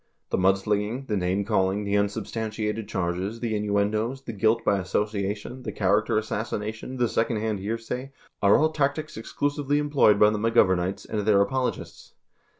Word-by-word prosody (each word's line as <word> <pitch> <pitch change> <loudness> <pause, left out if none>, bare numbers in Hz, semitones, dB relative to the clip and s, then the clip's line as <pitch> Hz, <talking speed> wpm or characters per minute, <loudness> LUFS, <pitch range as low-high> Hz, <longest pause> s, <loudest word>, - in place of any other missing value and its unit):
The - - +1
mudslinging, 105 +6 +1
the 110 - -1
name 95 +1 0
calling, 100 -1 +1
the 100 0 -1
unsubstantiated 105 +1 -2
charges, 95 +3 -2
the 115 -2 -2
innuendoes, 105 +5 0
the 115 - -6
guilt 110 +2 +2
by 100 -1 +3
association, 105 +5 -2
the - - -5
character 105 +3 +1
assassination, 110 +3 -3
the 120 -1 +2
second 115 0 0
hand 105 -1 -2
hearsay 115 +6 -4 0.3
are 100 0 +6
all 155 +1 +2
tactics 155 +1 -1
exclusively 145 +5 -1
employed 145 -8 +3
by 105 0 +6
the 105 - -2
McGovem 105 -5 +3
ites 95 +2 -3
and 110 - -3
their 105 -1 +3
apologists. 125 +5 -3
105 Hz, 155 wpm, -26 LUFS, 100-115 Hz, 0.3 s, are